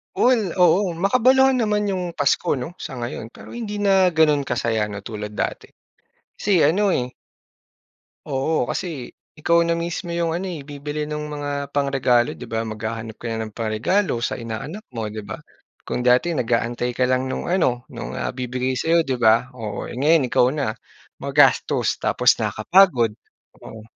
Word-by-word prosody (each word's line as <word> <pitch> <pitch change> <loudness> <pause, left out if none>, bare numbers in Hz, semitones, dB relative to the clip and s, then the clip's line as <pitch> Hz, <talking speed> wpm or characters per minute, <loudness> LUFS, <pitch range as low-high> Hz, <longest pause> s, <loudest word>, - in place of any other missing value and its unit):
Well, 230 -7 +3
oo. 180 +2 +4
Makabaluhan 255 +9 +4
naman 210 -1 0
yung 180 -3 -2
Pasko 145 -4 +1
'no, 160 +8 -6
sa 130 -7 -7
ngayon. 120 -1 -5
Pero - - -12
hindi 210 -3 -4
na 195 -2 +4
ganun 155 -3 +3
ka - - -2
saya 115 -2 0
'no 100 - -5
tulad 105 0 -6
dati. - - -4 0.7
Kasi 195 -5 +2
ano 190 +6 +3
eh 125 0 -1 1.2
Oo, 135 -1 -1
kasi 155 -9 -4 0.2
ikaw 170 +2 +2
na 170 - +1
mismo 170 +1 -3
yung 170 -1 0
ano, 190 - -4
eh, 175 -5 -5
bibili 145 +1 -5
nung 150 0 -4
mga 145 -1 -4
pangregalo, 135 -4 +2
di - - -8
ba? 115 0 -2
Maghahanap 110 0 -5
ka - - -12
na 110 - -3
ng - - -23
pangregalo 115 - 0
sa - - -2
inaanak 120 - -6
mo 110 -2 -3
di 105 0 -7
ba? - - -7 0.4
Kung 125 - -4
dati 125 +7 +4
nag-aantay 120 -4 -1
ka 125 +1 +1
lang 130 0 +1
nung 130 - -4
ano, 130 -10 +1
nung - - -7
ah, - - -3
ibibigay 125 +1 -2
sa'yo 165 +4 +3
'di 135 -5 -2
ba, 115 +1 +4
oo, 105 -3 -5
ngayon 145 +1 +2
ikaw 125 - +4
na. 145 -6 -1 0.5
Magastos - - +2
tapos - - +3
nakapagod, 130 - +3 0.5
oo. 110 -1 -11
140 Hz, 165 wpm, -22 LUFS, 120-175 Hz, 1.2 s, oo